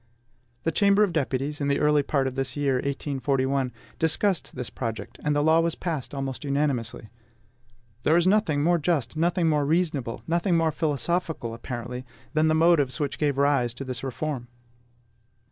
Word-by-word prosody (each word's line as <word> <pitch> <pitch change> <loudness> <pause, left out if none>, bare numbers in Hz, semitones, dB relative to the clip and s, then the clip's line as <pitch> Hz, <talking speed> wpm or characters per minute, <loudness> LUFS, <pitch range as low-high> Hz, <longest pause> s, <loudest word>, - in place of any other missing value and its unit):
The 165 - +1
Chamber 200 +4 +4
of 195 -5 0
Deputies, 145 0 -1
in 140 - 0
the 140 - +1
early 150 0 +4
part 140 -1 0
of 130 - -2
this 135 +2 -3
year, 140 -3 +1
1841, 135 -1 -1 0.3
discussed 165 +4 0
this 125 -2 -5
project, 115 -3 -5
and 150 0 +1
the 145 - +2
law 160 +1 +5
was 165 0 +1
passed 155 -6 -4
almost 135 0 -4
unanimously. 140 -6 -1 0.9
There 160 +5 +4
is 175 - +3
nothing 185 -7 +3
more 175 +1 +3
just, 150 -5 0
nothing 170 +1 +1
more 150 -2 +2
reasonable, 145 -6 0
nothing 170 +1 +1
more 165 -1 +2
philosophical 155 -4 -1
apparently, 120 +1 -6 0.3
than 155 0 +3
the 155 - +3
motives 160 -4 +3
which 145 -2 -2
gave 145 -3 +1
rise 140 -4 +2
to 135 - -6
this 130 -2 -5
reform. 135 -1 -3
145 Hz, 165 wpm, -26 LUFS, 130-165 Hz, 0.9 s, law